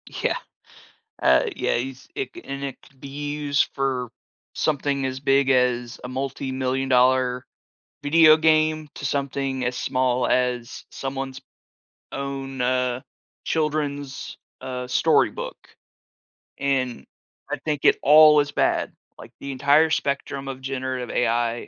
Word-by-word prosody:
Yeah. - - -1 0.8
Uh, 65 - +4
yeah, - - 0
he's 130 +2 -6
it 410 - -3
c 350 - -9
and 140 0 -6
it 135 -2 -5
could 135 - -22
be 140 - -9 0.3
used 145 -1 +1
for 130 -3 -1 0.5
something 140 -2 0
as 130 0 -3
big 135 0 +2
as 125 -2 +1
a 125 - -6
multimillion 130 0 -2
dollar 125 0 +3 0.6
video 155 +1 +6
game 155 -1 +2
to - - -6
something 135 -1 -2
as 125 0 -2
small 130 -1 0
as 125 -1 -1
someone's 135 -1 -5 0.7
own, 135 -1 -5
uh, 125 0 0 0.4
children's, 145 -3 -2 0.2
uh, 125 -1 -5
storybook, 125 - +1 1.0
and 130 - -1 0.5
I - - -1
think 150 -3 -2
it - - +6
all 150 +1 +8
is 145 0 -4
bad, - - 0 0.2
like, - - -12
the 140 - -6
entire 145 +4 +4
spectrum 140 -2 -2
of 135 -1 -5
generative 130 -2 -3
AI 120 0 0
135 Hz, 125 wpm, -24 LUFS, 125-140 Hz, 1.0 s, all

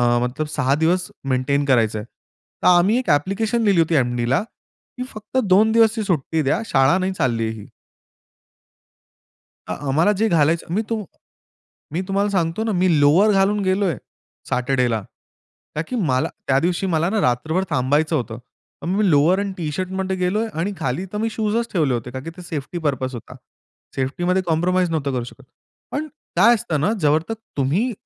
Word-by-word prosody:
अ, - - +2
मतलब 140 +5 -3
6 130 +2 +2
दिवस 175 +4 +1 0.2
मेंटेन 135 +2 +1
करायचा 115 -5 +2
आहे. 105 - -7 0.6
तर - - +4
आम्ही 180 +5 +5
एक 255 - -4
ॲप्प्लिकेशन 200 +10 +1
लिहिली 200 -5 +3
होती 165 0 +1
एम-डीला 120 -1 +1 0.6
की 250 - -3
फक्त 215 +2 -6
2 205 +2 +4
दिवसची 225 -1 +3
सुट्टी 160 -4 0
द्या 140 +9 +1
शाळा 135 0 +3
नाही 190 0 -1
चालली 120 -10 0
आहे 110 - -3
ही. - - -12 2.0
अ, - - -2
आम्हाला 160 +9 +3
जे 220 +2 +2
घालायचं. 165 0 +1
मी 210 - +1
तुम 225 -2 -2 0.9
मी 170 - 0
तुम्हाला 200 +1 +1
सांगतो 185 +1 0
ना, 225 - -1
मी 180 -4 +2
लोवर 165 +9 +5
घालून 200 +1 +2
गेलोय. 185 -2 +1 0.5
सॅटरडेला. 125 -3 +1 0.7
का 150 - 0
की - - -4
मला, 135 - +1 0.2
त्या 135 0 +3
दिवशी 175 +4 0
मला 165 -1 +1
ना 215 +2 0
रात्रभर 155 +8 +1
थांबायचं 145 +5 +1
होतं. 120 -5 -3 0.4
पण 170 - -4
मी 200 +1 +2
लोवर 160 +5 +4
एंड 200 -1 -2
टी-शर्टमध्ये 185 +4 -3
गेलोय. 190 +5 0
आणि 195 +5 -1
खाली 140 +4 -2
तर - - -2
मी 225 +2 0
शूजच 225 +2 -1
ठेवले 155 -8 +2
होते 120 +1 -4
कारण 130 +1 -6
की 165 - -6
ते - - -8
सेफ्टी 165 -1 -5
पर्पज 130 -2 -1
होता. 115 - -10 0.6
सेफ्टीमध्ये 175 +8 0
कॉम्प्रोमाईज 175 +2 +1
नव्हतो 145 -4 -1
करू 125 -2 -1
शकत. 120 - -12 0.5
पण 305 +2 -3 0.3
काय 210 +7 +6
असतं 165 -8 -2
ना? 205 - +2
जोपर्यंत 155 +9 +1 0.2
तुम्ही 160 - +1
170 Hz, 170 wpm, -21 LUFS, 140-195 Hz, 2.0 s, काय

